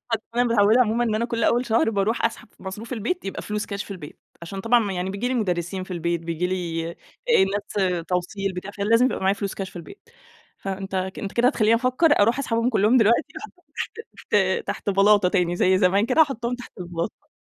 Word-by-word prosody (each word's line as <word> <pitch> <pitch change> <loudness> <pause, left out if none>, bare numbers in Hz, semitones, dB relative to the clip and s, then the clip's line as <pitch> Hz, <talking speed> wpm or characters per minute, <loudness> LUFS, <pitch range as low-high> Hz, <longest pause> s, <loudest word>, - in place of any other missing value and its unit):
أصل 225 -1 0
أنا 245 +1 +3
متعودة 230 +1 +4
عمومًا 235 +1 +2
إن 220 - 0
أنا 225 +2 0
كل 230 -1 -1
أول 240 +1 +2
شهر 225 0 +2
باروح 210 +2 0
أسحب 230 -1 -2
ف - - -28
مصروف 210 +6 -7
البيت 250 - -2
يبقى 195 - -5
فلوس 210 0 -3
كاش 200 0 -4
في - - -15
البيت، 175 -7 -9 0.2
عشان 195 +3 -6
طبعًا 235 +4 +4
ما 205 -4 -1
يعني 180 +1 -2
بييجي 200 +5 -2
لي 260 - -1
مدرسين 185 -3 -2
في - - -17
البيت، 170 -1 -1
بييجي 170 +1 -2
لي 170 -3 -3
آآ 170 - -11 0.8
الناس 180 -4 0
توصيل، 190 +2 -2
بتاع، 185 +3 -6
فلازم 225 +5 +2
يبقى - - -2
معايا 190 +1 +2
فلوس 200 -1 -4
كاش 195 -1 -5
في - - -14
البيت. 175 - -11 0.5
فأنت 195 0 -5
أنت 190 +2 -3
كده 240 +1 +3
هتخلّيني 225 -4 +3
أفكر 255 +4 +3
أروح 230 +5 +3
أسحبهم 230 -3 0
كلهم 220 +1 +3
دلوقتي 235 +7 +3
أحطهم 365 -4 -13 0.3
تحت 195 - -1
تحت 200 +1 -2
بلاطة 200 0 +4
تاني 175 -2 +1
زي 185 +1 +3
زمان 195 +3 +3
كده 290 +5 +5
أحطهم 245 -4 -2
تحت 245 - -10
البلاطة. 175 - -5
205 Hz, 210 wpm, -23 LUFS, 185-235 Hz, 0.8 s, كده